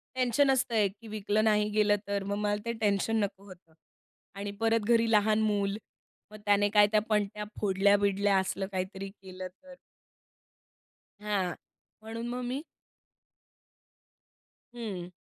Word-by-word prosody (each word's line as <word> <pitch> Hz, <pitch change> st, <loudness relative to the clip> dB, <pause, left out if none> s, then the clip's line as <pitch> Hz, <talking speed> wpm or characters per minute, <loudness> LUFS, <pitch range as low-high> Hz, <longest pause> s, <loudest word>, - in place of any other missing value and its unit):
Tension 260 Hz, +2 st, +3 dB
असतं 255 Hz, -3 st, 0 dB
एक, 200 Hz, -3 st, +2 dB
की 230 Hz, -, -11 dB
विकलं 215 Hz, 0 st, 0 dB
नाही 210 Hz, -1 st, +3 dB
गेलं 210 Hz, 0 st, +3 dB
तर 200 Hz, -1 st, -1 dB
मग 200 Hz, +1 st, -2 dB
मला 205 Hz, 0 st, 0 dB
ते 235 Hz, -, -1 dB
टेन्शन 210 Hz, +2 st, +1 dB
नको 200 Hz, 0 st, -4 dB
होतं. 175 Hz, -3 st, -15 dB, 0.6 s
आणि 200 Hz, +1 st, -4 dB
परत 225 Hz, 0 st, +3 dB
घरी 230 Hz, -1 st, +4 dB
लहान 215 Hz, 0 st, +3 dB
मूल. 205 Hz, -1 st, 0 dB, 0.5 s
मग 215 Hz, -, -9 dB
त्याने 205 Hz, 0 st, +4 dB
काय 205 Hz, 0 st, +6 dB
त्या 215 Hz, -, +4 dB
पणत्या 210 Hz, 0 st, 0 dB, 0.2 s
फोडल्या-बिडल्या 200 Hz, 0 st, +3 dB
असलं 190 Hz, 0 st, -2 dB
काहीतरी 190 Hz, +1 st, -4 dB
केलं 185 Hz, -2 st, -9 dB
तर? 270 Hz, +9 st, -16 dB, 1.4 s
हां. 200 Hz, -4 st, -1 dB, 0.5 s
म्हणून 225 Hz, +2 st, -6 dB
मग 245 Hz, +1 st, -3 dB
मी 255 Hz, +4 st, -3 dB, 2.1 s
हं. 190 Hz, -7 st, -5 dB
205 Hz, 135 wpm, -29 LUFS, 195-220 Hz, 2.1 s, काय